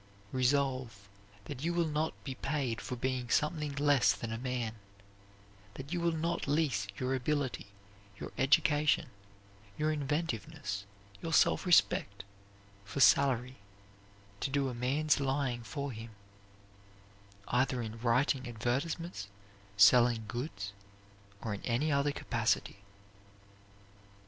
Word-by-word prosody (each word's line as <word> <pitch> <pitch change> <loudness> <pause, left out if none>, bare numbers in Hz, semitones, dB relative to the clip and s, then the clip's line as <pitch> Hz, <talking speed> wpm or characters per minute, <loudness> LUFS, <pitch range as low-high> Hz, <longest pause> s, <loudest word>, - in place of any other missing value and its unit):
Resolve 130 -5 0 0.4
that 135 +1 -7
you 170 +1 0
will 170 -1 +2
not 155 +1 -1
be 135 - -4
paid 130 -3 -2
for 125 - -4
being 125 0 -2
something 150 0 0
less 140 -7 +4
than 115 0 -6
a - - -3
man; 125 -3 -2 1.0
that 140 +5 -7
you 175 - -1
will 170 0 +2
not 165 0 -2
lease 140 -9 +1
your 130 0 -1
ability, 135 -2 -1 0.5
your - - -6
education, 150 +1 +3 0.7
your 155 +1 +1
inventiveness, 145 -6 -3 0.4
your 165 - -4
self 165 - +3
respect, 100 - +3 0.6
for 100 +6 -6
salary, 130 -2 +4 0.8
to - - -1
do 140 -1 0
a - - -4
man's 140 +6 +1
lying 135 -3 -1
for 140 +4 -4
him; 115 0 -8 1.4
either 125 +1 +1
in 110 0 -7
writing 125 +2 +1
advertisements, 130 - -2 0.5
selling 120 +2 +6
goods, 110 -6 -5 0.7
or 110 - -2
in 100 - -6
any 130 +6 0
other 140 +1 +2
capacity. 120 - -1
130 Hz, 120 wpm, -32 LUFS, 120-150 Hz, 1.4 s, selling